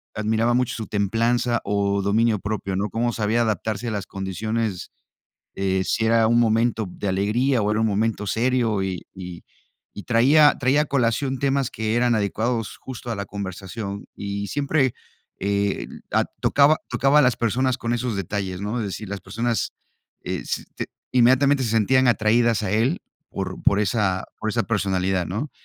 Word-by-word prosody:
admiraba 110 +2 +1
mucho 125 0 +1
su 110 - -5
templanza 115 +4 +1
o 100 -1 0
dominio 105 +2 +2
propio, 100 -1 -3
¿no?, 100 +3 -1
cómo 120 +4 -1
sabía 110 +2 +1
adaptarse 110 +1 -2
a - - -1
las 100 -2 -4
condiciones, 100 +1 -3 0.6
eh, 95 -1 0
si 115 - 0
era 115 0 +4
un 120 +1 +3
momento 115 -1 +2
de 100 - -5
alegría 110 +6 +1
o 105 - +1
era 105 - +1
un 110 - +3
momento 105 0 -1
serio, 115 -2 +1
eh, 95 -2 -3 0.2
y 90 -2 -8 0.5
y 105 - -7
traía 140 +6 +5
traía 140 +3 +3
colación 135 0 0
temas 135 -1 +1
que 110 0 -2
eran 120 0 +3
adecuados 110 +2 -1
justo 120 -2 -7
a - - -2
la 100 0 -4
conversación, 100 +1 -6
y 100 0 -4
siempre, 140 -1 +1 0.5
eh, 100 0 -1 0.2
a - - +2 0.2
tocaba 145 +2 +4
tocaba 140 +2 +3
a - - +7
las 125 -3 +3
personas 125 +3 +1
con 115 +1 -2
esos 120 -2 -2
detalles, 95 -1 -3
¿no? 105 +4 -2
Es 110 - -2
decir, 105 +2 -6
las 100 -1 -5
personas, 115 +3 -2 0.5
eh, - - -3
se - - -3
t - - -4 0.2
inmediatamente 130 +3 +4
se 115 - -1
sentían 130 +4 +3
atraídas 115 0 +3
a 100 - -2
él, 120 - +1 0.3
por 95 -1 -5
por 100 - +4
esa 100 -3 0
por 110 - -2
esa 115 +1 0
personalidad, 95 -4 0
¿no?, 110 - -4
110 Hz, 170 wpm, -23 LUFS, 100-120 Hz, 0.6 s, a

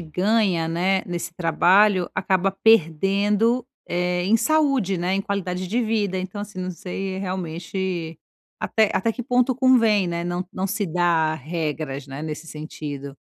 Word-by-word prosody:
ganha, 180 0 +1
né, 185 +3 +1
nesse 175 -1 -5
trabalho, 180 +3 +3
acaba 190 0 +1
perdendo, 205 +4 +2 0.2
eh, 180 0 0
em 220 +4 +4
saúde, 275 - +2
né, 180 +2 0
em 195 - +1
qualidade 185 -2 -3
de 235 +7 0
vida. 215 -4 0
Então, 185 +2 -4
assim, 205 -2 -7
não 185 0 -3
sei 190 +2 -5
realmente, 180 -2 -4 0.4
até 220 -2 +2
até 225 +5 +1
que 245 - -6
ponto 250 +1 +2
convém, 230 -7 +4
né, 170 0 -2
não 175 +1 -3
não 190 +1 -2
se 205 +1 -1
dar 165 -2 +1
regras, 150 -2 -4
né, 135 +2 -7
nesse 155 +1 -5
sentido. 145 -3 -7
185 Hz, 150 wpm, -23 LUFS, 170-205 Hz, 0.4 s, em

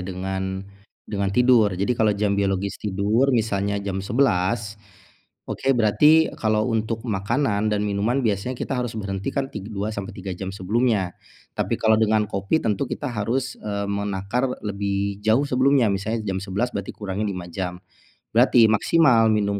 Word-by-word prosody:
dengan 95 +1 -4 0.4
dengan 100 -2 -2
tidur. 120 0 +4
Jadi 100 +6 +1
kalau 110 -3 +1
jam 100 0 +1
biologis 100 0 -1
tidur 105 +6 +1
misalnya 105 -5 0
jam 100 -1 -3
11.00, 105 -1 0 0.7
oke - - -3
berarti 150 +9 +4
kalau 110 -1 +1
untuk 110 +1 -2
makanan 110 +1 0
dan 105 - +1
minuman 105 +6 0
biasanya 110 +4 -1
kita 135 - -4
harus 120 -2 -3
berhenti 100 -2 -4
kan 135 -1 -1
tig 100 +2 -7
2 105 0 -3
sampai 100 +1 -5
3 95 -1 -5
jam 95 0 -5
sebelumnya, 100 -1 0 0.4
tapi - - 0
kalau 110 0 +4
dengan 110 -1 +3
kopi 100 +10 0
tentu 110 +4 0
kita 145 - -4
harus, 120 +4 -1
eee, 100 -1 -3
menakar 100 +5 -1 0.2
lebih 100 0 -2
jauh 110 +6 +3
sebelumnya, 130 -2 +3
misalnya 110 +3 -2
jam 95 -2 -2
11.00 100 +6 -2
berarti - - -4
kurangi 100 0 -3
5 90 -3 -5
jam. 90 -2 -4 0.6
Berarti 115 -2 +6
maksimal 115 -2 +4
minum 100 -1 0
105 Hz, 155 wpm, -23 LUFS, 100-115 Hz, 0.7 s, Berarti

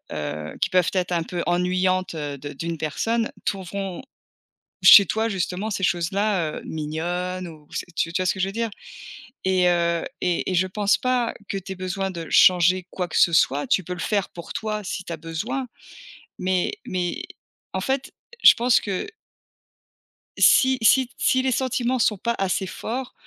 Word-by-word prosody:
heu, 75 0 -5
qui - - +2
peuvent 180 -2 +3
être 180 -2 -1
un 170 -1 +1
peu 175 +1 -4
ennuyantes, 185 +1 0
heu, 145 -2 -4
de 145 +2 -8
d'une 165 +3 -4
personne 225 +10 -1
trouveront 195 -1 -4 0.8
chez 200 - +10
toi 220 +5 0
justement, 190 +2 -2
ces 190 -2 -2
choses-là, 180 -1 0
heu, - - -10
mignonnes 175 +4 -3
ou 155 -2 -14
c - - -4
tu 165 - 0
tu 185 - -1
vois - - -1
ce - - +2
que 190 - -7
je 190 - +1
veux - - -5
dire? 230 +2 -1 0.8
Et 185 -1 +3
heu, 170 -1 +1 0.2
et 180 +1 -1
et - - -1
je 185 +1 +3
pense 200 +2 +1
pas 250 -2 0 0.2
que - - -3
tu 195 0 -6
aies - - -5
besoin 190 +1 -3
de 170 -2 -7
changer 180 -1 +5
quoi 180 -1 -3
que 160 - -5
ce 170 - +5
soit. 145 -3 +2
Tu 190 - +2
peux 180 +1 -5
le 180 - -10
faire 200 +3 0
pour 170 - -9
toi 215 -1 -3
si 185 0 -4
tu 170 - -7
as - - -3
besoin, 210 - -4 0.7
mais 185 -1 0
mais 185 - -3 0.5
en 190 - -2
fait 265 +5 -2 0.3
je - - +10
pense 245 +1 +3
que 195 -3 -3 1.3
Si 260 0 +5
si 255 +3 +5
t 245 - -26
si 260 - +2
les 260 0 0
sentiments 255 0 0
sont 215 -2 +2
pas 235 +5 -1
assez 190 0 0
forts, 245 +7 -5
185 Hz, 190 wpm, -23 LUFS, 170-215 Hz, 1.3 s, chez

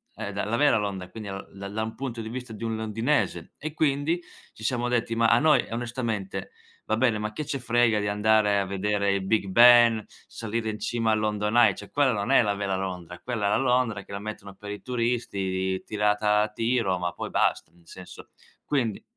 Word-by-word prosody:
ehm, 105 -2 -5
da 100 0 -2
la 115 +3 -1
vera 145 -5 +4
Londra, 100 -3 -3
e - - -23
quindi 110 -2 -7
lo 95 0 -7
da 100 0 -7
da 110 +2 -3
un 110 0 -5
punto 120 -4 -5
di 110 - -6
vista 125 -1 -6
di 110 - -8
un 115 -1 -1
londinese. 115 +6 -1
E 155 0 -6
quindi 155 +3 0 0.3
ci 110 - -13
siamo 120 +1 0
detti: 115 -1 0
"Ma 115 0 +2
a 115 - +5
noi, 155 -2 +4
onestamente, 115 -5 -3 0.3
va 110 - 0
bene, 115 -2 +2
ma 105 0 -4
che 150 - -4
ce 140 -2 -2
frega 120 -3 +2
di 105 - -2
andare 105 0 +3
a 100 - 0
vedere 100 +1 0
il 100 -1 -1
Big 100 0 +1
Ben, 120 +1 +6 0.2
salire 110 0 -4
in 105 - -4
cima 115 -1 0
al - - +2
London 105 +1 0
Eye" 120 -1 +6
cioè 105 - -10
quella 140 -3 +3
non 100 +4 -2
è 135 - +7
la 105 -2 +1
vera 100 -1 -2
Londra, 90 -2 -5
quella 115 -5 -2
è - - +2
la - - +3
Londra 125 -5 +1
che - - -15
la 100 - -4
mettono 100 -2 -7
per 105 +1 -10
i 105 - -7
turisti, 100 -6 -1
tirata 105 0 +2
a 105 - +1
tiro, 115 -3 0
ma 90 0 -2
poi - - -5
basta, - - 0
nel 85 -1 -25
senso. 90 +1 -12 0.4
Quindi 120 -8 -1
110 Hz, 220 wpm, -26 LUFS, 100-120 Hz, 0.4 s, è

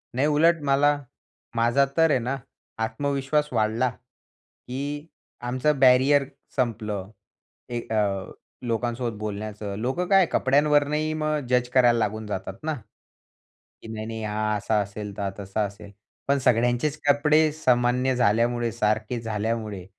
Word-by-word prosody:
नाही. 135 +4 +2
उलट 160 +2 +3
मला 145 +1 +3 0.6
माझा 120 +4 +3
तर 165 0 +5
आहे 130 - +3
ना, 130 +3 -2 0.5
आत्मविश्वास 140 +5 -1
वाढला, 110 +3 +1
की 140 +3 -9 0.4
आमचं 135 +3 +1
बॅरियर 135 +2 +5 0.3
संपलं. 105 -6 -2 0.6
ए, 120 -1 -2
अ, 100 -3 0 0.4
लोकांसोबत 115 -1 -2
बोलण्याचं. 105 -1 -5
लोकं 135 +10 -1
काय 195 0 +5
कपड्यांवरनंही 150 +2 +2
मग 155 0 0
जज 125 -1 +2
करायला 120 -2 +5
लागून 110 0 -2
जातात 95 -2 -4
ना, 160 0 -1 1.1
की - - -11
नाही, 110 -1 -5
नाही 115 -1 -5
हा 110 0 -1
असा 105 +1 0
असेल, 105 0 -6
तर - - -4
हा 100 - 0
तसा 100 +2 -3
असेल. 100 0 -10 0.4
पण 140 0 +3
सगळ्यांचेच 120 +4 +2
कपडे 150 +2 +4
सामान्य 125 -3 +2
झाल्यामुळे 120 0 +2
सारखे 110 +1 0
झाल्यामुळे 110 -3 -3
120 Hz, 130 wpm, -25 LUFS, 110-140 Hz, 1.1 s, तर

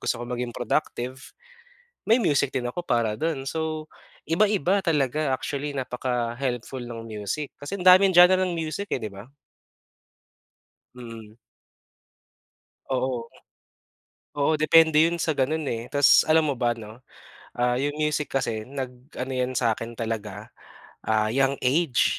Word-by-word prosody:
gusto 120 - -2
ko - - -4
maging 125 -1 -3
productive, 125 +2 -2 0.9
may 225 - +7
music 140 -5 +2
din 125 -1 -1
ako 175 - -5
para 115 -5 +1
dun. 155 -4 -1
So 155 0 -3 0.4
iba-iba 195 +1 +2
talaga 145 -2 +1
actually 145 +2 -4
napaka-helpful 125 0 -3
ng 115 -1 -7
music 110 +7 -4
kasi 145 +7 -5
ang - - -4
daming 185 0 +7
genre 180 +1 +7
ng 185 -2 0
music 165 +5 -4
eh, - - 0
'di 105 - -4
ba? 100 +3 -11 1.7
Mm. 115 -3 -10 1.6
Oo. 125 -2 -1 1.0
Oo, 145 +2 +1
depende 160 +1 +5
yun 170 +1 0
sa 160 -2 0
ganun 150 +3 -1
eh, 115 -1 -4
tas 145 -1 +6
alam 155 0 +3
mo 140 - 0
ba 120 -1 +1
'no, 115 +1 -9 0.6
ah, 125 0 +2
yung 145 +4 -2
music 150 -1 -1
kasi 115 -5 -1
nag-ano 130 +1 -7
'yan 125 0 -1
sa 115 -3 +2
akin 115 +1 -8
talaga, 110 -2 -4 0.6
ah, 110 -1 +1
young 135 +3 +2
age, 135 +1 +2
130 Hz, 140 wpm, -25 LUFS, 120-155 Hz, 1.7 s, may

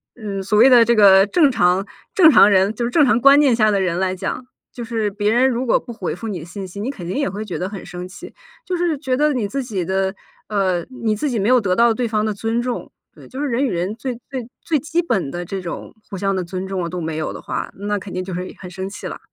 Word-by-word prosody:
嗯， 200 -4 -5
所 210 +1 +1
谓 250 +4 +8
的 245 -2 +7
这 235 +1 +3
个 195 -2 +7
正 295 - +4
常 190 -5 +2 0.3
正 365 -8 +7
常 230 -7 +7
人 195 +2 +3
就 240 - -3
是 235 - -1
正 300 +1 +5
常 245 -2 +2
观 275 +2 +7
念 275 -5 +4
下 215 -2 +3
的 200 - +1
人 180 -3 0
来 190 -1 0
讲， 190 +6 -4 0.3
就 240 - -6
是 225 -2 -1
别 205 +1 0
人 250 +3 +4
如 250 +1 -2
果 235 - +3
不 240 - -9
回 225 - -4
复 225 - -7
你 185 -7 -5
信 190 +3 -7
息， 200 +3 -8
你 245 +6 -2
肯 180 -11 -9
定 180 - -3
也 280 -1 0
会 210 +2 -5
觉 185 - -5
得 185 +2 -3
很 200 -2 -8
生 180 0 -7
气。 180 - -11 0.3
就 365 - -2
是 345 -3 0
觉 265 -3 -1
得 300 +2 +2
你 235 -6 -1
自 275 +6 -3
己 200 -8 -3
的， 190 +1 0 0.4
呃， 190 -4 0
你 230 -4 -2
自 290 +8 -2
己 240 -4 -1
没 200 - 0
有 250 0 +5
得 190 -3 0
到 235 +1 +4
对 245 +2 -2
方 215 -1 0
的 215 - -1
尊 225 +3 -1
重。 245 0 -4 0.2
对， - - -15
就 265 +2 -7
是 295 - 0
人 260 +2 0
与 255 - -1
人 180 +4 -2
最 255 +2 -4 0.2
最 255 -4 -5 0.2
最 315 -3 +1
基 320 +4 -1
本 210 - -1
的 175 +3 -4
这 195 +3 -5
种 175 -2 -7 0.2
互 195 - -6
相 195 +1 0
的 185 - -1
尊 185 +2 -5
重 185 -3 -3
都 180 0 -5
没 160 -1 -3
有 155 - -3
的 - - -8
话， - - -4
那 205 +1 -3
肯 195 -1 -8
定 185 - -3
就 185 0 -6
是 180 +1 -5
很 180 - -9
生 190 +1 -5
气 200 - -7
啦。 - - -7
210 Hz, 305 characters per minute, -20 LUFS, 190-250 Hz, 0.4 s, 谓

